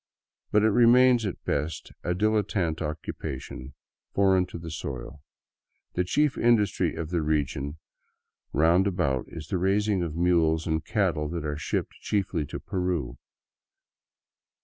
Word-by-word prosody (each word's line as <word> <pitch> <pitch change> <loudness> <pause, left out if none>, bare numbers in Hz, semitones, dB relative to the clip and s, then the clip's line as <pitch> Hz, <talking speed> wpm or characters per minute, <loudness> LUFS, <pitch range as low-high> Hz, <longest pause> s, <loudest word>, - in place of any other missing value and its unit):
But 105 0 +3
it 110 - +4
remains 120 0 +5
at 95 - -6
best 75 +4 -2
a 90 - 0
dilettante 100 -5 0
occupation, 70 -3 -6 0.4
foreign 95 -2 +4
to - - -8
the 80 -1 -7
soil. 70 -1 -6 0.7
The 90 - +1
chief 145 +10 +1
industry 115 -4 +2
of 80 0 -5
the 85 -2 +1
region 75 -1 -1 0.7
round 85 +6 +4
about 70 -9 0
is 80 -1 -9
the 95 - 0
raising 100 +1 +2
of 80 -3 -3
mules 80 -2 +2
and 80 -1 -1
cattle 85 -8 0
that 85 -1 -4
are 75 0 -2
shipped 80 +2 -2
chiefly 95 -7 -1
to - - -6
Peru. 90 -8 -2
85 Hz, 135 wpm, -27 LUFS, 75-100 Hz, 0.7 s, remains